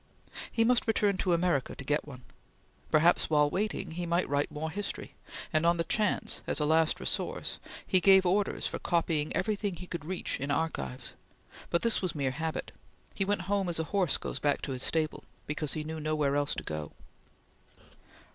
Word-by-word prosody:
He 225 - +2
must 240 +1 +3
return 205 -3 +2
to 185 - 0
America 170 -6 +1
to - - -8
get 150 +2 0
one. 130 -3 -10 0.7
Perhaps, 165 +3 +4
while 150 -1 +3
waiting, 195 -3 -2
he 175 +1 -4
might 170 +2 +1
write 145 +1 0
more 160 +2 -4
history, 205 +3 -4 0.4
and 155 0 +3
on 170 +1 +4
the 165 - +1
chance 210 +4 +1
as - - +1
a 150 - +1
last 160 +1 +3
resource, - - -2 0.3
he 185 - +4
gave 190 +1 +6
orders 195 +3 +1
for - - -2
copying 165 -3 0
everything 205 -3 -1
he 180 - -8
could 170 -3 -5
reach 180 +3 -2
in 140 - -3
archives, 140 - -2 0.6
but 170 - +1
this 230 -1 +2
was 185 -3 -2
mere 135 -3 0
habit. 160 +3 -3 0.4
He 195 - 0
went 200 -1 0
home 195 0 0
as 170 - -2
a 160 - 0
horse 185 -7 +2
goes - - -5
back 145 -1 +1
to 140 - -3
his 130 -1 -2
stable, 155 +1 0 0.2
because 150 0 -1
he 155 - -3
knew 160 +1 -5
nowhere 150 -2 0
else 145 0 +1
to - - -5
go. 75 -1 -5
165 Hz, 190 wpm, -30 LUFS, 150-185 Hz, 0.7 s, gave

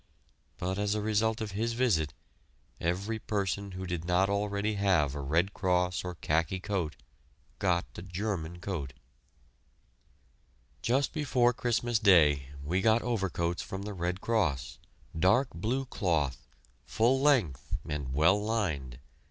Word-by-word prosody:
But 95 +2 -2
as 105 0 +1
a - - 0
result 110 +1 +1
of 110 -2 -3
his 115 +4 -1
visit 110 - +1 0.7
every 100 +7 -1
person 100 -2 -2
who 95 0 -5
did 90 -2 -3
not 90 +3 +2
already 100 +1 0
have 95 -9 +2
a 75 - -4
Red 85 +8 +1
Cross 90 -2 +1
or 90 -1 -5
khaki 80 +3 0
coat 95 -6 -2 0.6
got 90 -3 +1
a - - -7
German 90 -2 -4
coat. 85 -8 -4 1.9
Just 135 +4 +1
before 130 -6 +2
Christmas 120 -1 0
Day 75 -10 +5
we 90 +6 0
got 110 +2 +3
overcoats 95 -7 -1
from 95 +1 -6
the 105 0 -5
Red 90 +1 -2
Cross, 100 - 0 0.4
dark 95 - +3
blue 115 +11 -1
cloth, 80 - -1 0.4
full 120 +4 +2
length 115 - +2
and 70 -4 -3
well 80 +9 +3
lined. 80 - -2
95 Hz, 135 wpm, -30 LUFS, 85-110 Hz, 1.9 s, Day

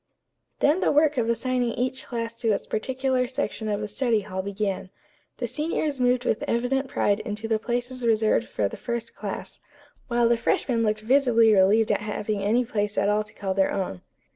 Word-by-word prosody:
Then 300 +5 +4
the - - +2
work 295 -2 +3
of 230 -1 0
assigning 245 0 0
each 255 +1 -2
class 230 -1 -3
to 230 -2 +1
its - - -3
particular 255 +2 -1
section 255 -4 -3
of 205 0 -1
the 210 - -3
study 225 0 +1
hall 190 -1 -4
began. 195 -1 -3 0.5
The - - -2
seniors 300 -2 -2
moved 250 0 +2
with 220 - 0
evident 255 +3 0
pride 205 -5 +1
into 215 +1 -5
the 220 -1 +1
places 245 +2 -3
reserved 225 0 +2
for 105 - -1
the - - -8
first 235 -1 -4
class, - - -6 0.5
while 240 -1 +2
the 235 0 +3
freshmen 235 0 0
looked 215 -1 0
visibly 230 -2 +4
relieved 205 +3 +4
at - - +1
having 210 0 -3
any 230 +5 +2
place 210 -3 -2
at 200 - +2
all 210 +1 +2
to 210 - -15
call 195 -1 -2
their 190 0 +2
own. 140 - -3
230 Hz, 190 wpm, -25 LUFS, 210-250 Hz, 0.5 s, Then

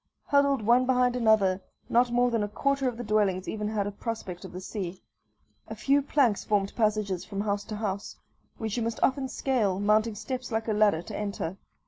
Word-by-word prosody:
Huddled 280 -4 +3
one 245 +4 +4
behind 250 -1 +3
another, 215 -5 +3 0.3
not 240 +1 +3
more 245 +1 +2
than 230 -2 +1
a 205 - 0
quarter 275 +5 0
of 245 -2 -2
the 245 - -4
dwellings 205 -4 +1
even 210 -1 -3
had 210 -2 -1
a 205 - -3
prospect 205 -4 -5
of - - -8
the 185 - -6
sea. 185 -1 -5 0.7
A - - -6
few 280 +1 +2
planks 270 -7 +2
formed 200 -2 0
passages 210 -5 0
from 200 +1 -4
house 205 -1 -1
to 215 - -5
house, 200 -2 -3 0.4
which 220 0 -3
you - - 0
must 230 0 -2
often 270 0 +2
scale, 225 -9 0
mounting 215 +2 +2
steps 255 +3 -5
like 220 0 -1
a 220 - +1
ladder 205 -6 +3
to - - -7
enter. 200 -4 -3
215 Hz, 200 wpm, -28 LUFS, 200-245 Hz, 0.7 s, one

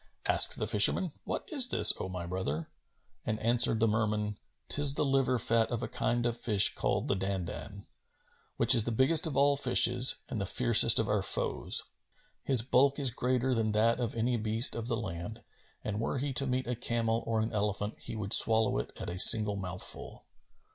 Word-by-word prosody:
Asked - - +2
the - - -4
fisherman, 155 - +3
"What - - -6
is 265 -5 +4
this, - - +5
O 95 - -6
my 90 -2 -7
brother?"; 85 -3 -6 0.5
and 110 - -4
answered 115 0 +1
the 115 - +1
Merman, 105 -1 -3 0.3
"'Tis 145 -1 +1
the - - -2
liver 135 -2 -1
fat 115 0 -1
of 120 -1 -5
a - - -5
kind 120 -1 -3
of 120 -1 -2
fish 105 -4 +3
called - - -4
the - - -2
Dandбn,[FN#261] 95 +1 -7 0.7
which - - +3
is 110 - +2
the 120 - -4
biggest 140 +8 +2
of 140 -4 -6
all 140 +1 +2
fishes 125 -2 +5
and 115 -6 -6
the 95 - -4
fiercest 115 +3 +5
of 110 - +2
our 105 -1 -2
foes. - - -3 0.6
His 125 -5 +1
bulk 135 +2 0
is 135 -4 0
greater 130 +1 -3
than 110 -3 -3
that 115 +3 0
of 120 -2 -5
any 120 +2 -2
beast 110 +2 +2
of 115 -1 -7
the 120 -2 -3
land, 105 +1 -9 0.4
and 105 -1 -6
were 115 - -4
he 140 +1 -5
to 135 +2 +3
meet 130 0 -3
a 125 - -5
camel 115 -1 -3
or 115 -1 -2
an 110 +1 -4
elephant, 105 0 -4
he - - -9
would 105 0 -3
swallow 110 - +3
it - - -8
at - - -8
a 90 +1 -6
single 105 0 +6
mouthful." 90 -2 -9
115 Hz, 195 wpm, -28 LUFS, 105-125 Hz, 0.7 s, single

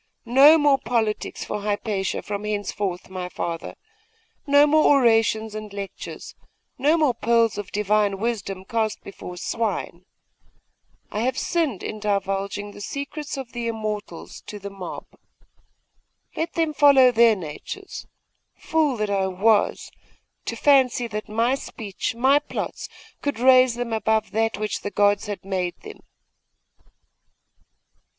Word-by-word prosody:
No 275 +7 +7
more 290 -3 +4
politics 225 -2 -2
for 210 - -4
Hypatia 205 -1 -2
from 205 0 -4
henceforth, 205 -3 -3
my 185 -1 -5
father; 170 -2 -5 0.7
no 285 +1 +6
more 300 -1 +5
orations 225 -2 +2
and 215 -1 -7
lectures; 200 -1 -7 0.5
no 295 +5 +3
more 300 -6 +3
pearls 230 -1 +2
of 205 - -7
Divine 210 -1 +1
wisdom 200 -4 -3
cast 220 -1 -2
before 180 -2 -9
swine. 190 -3 -3 1.1
I 210 - -3
have 250 +4 0
sinned 310 - -1
in 215 - -5
divulging 200 0 -2
the 205 - -11
secrets 285 +5 -5
of 260 -3 -7
the 240 -1 -4
Immortals 215 -6 -5
to 210 - -7
the 200 0 -8
mob. 195 -2 -7 1.3
Let 325 +1 -2
them 325 -2 0
follow 275 -4 +6
their 230 -1 +5
natures! 185 - -8 0.5
Fool 305 -5 0
that 215 -1 -1
I 195 -1 +1
was, 205 +3 +1 0.5
to - - -3
fancy 260 -4 +3
that 210 0 -5
my 230 +4 +1
speech, 225 -6 -4
my 265 +4 +4
plots, 295 - -5 0.3
could 285 -5 -2
raise 255 0 +5
them 240 -1 -3
above 220 0 0
that 225 -1 0
which 215 0 -3
the - - -3
gods 205 +1 +2
had 205 -2 -6
made 185 -2 -2
them! 425 0 -10
220 Hz, 135 wpm, -23 LUFS, 205-255 Hz, 1.3 s, No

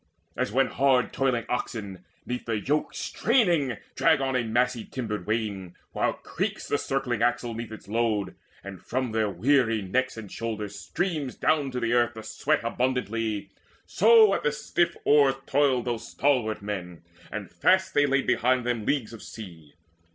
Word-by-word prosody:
As - - -1
when 135 +4 +3
hard 130 0 +2
toiling 130 -4 0
oxen, 100 -6 -4 0.2
'neath 125 0 -4
the 115 -2 0
yoke 145 +8 -1
Straining, 175 - +1 0.2
drag 160 -3 +4
on 135 -1 -1
a 125 - +2
massy 120 +1 0
timbered 110 -6 -5
wain, 105 -5 -2 0.2
While - - 0
creaks - - -4
the 145 - 0
circling 135 -4 -1
axle 120 0 +1
'neath 115 0 -6
its 110 - -10
load, 110 -2 0 0.3
And 100 -2 -9
from 130 -1 -2
their 110 -1 +1
weary 115 +3 +2
necks 130 +7 -1
and 105 -4 -8
shoulders 105 -3 -5
streams 155 -8 -2
Down 150 -3 +1
to 125 -1 -3
the 115 -1 -1
ground 120 0 +3
the 110 - -8
sweat 150 +6 0
abundantly; 115 -4 -1 0.3
So 220 -1 +6
at - - 0
the 150 - +1
stiff 170 +3 0
oars 140 -2 +5
toiled 135 -3 +2
those 120 -2 -3
stalwart 115 -7 0
men, 90 -5 -5 0.3
And - - -6
fast 190 0 +2
they 145 0 +4
laid 135 0 +1
behind 125 +1 +2
them 120 -3 -2
leagues 125 -6 0
of 115 - -10
sea. 85 -9 -11
120 Hz, 165 wpm, -26 LUFS, 110-135 Hz, 0.3 s, So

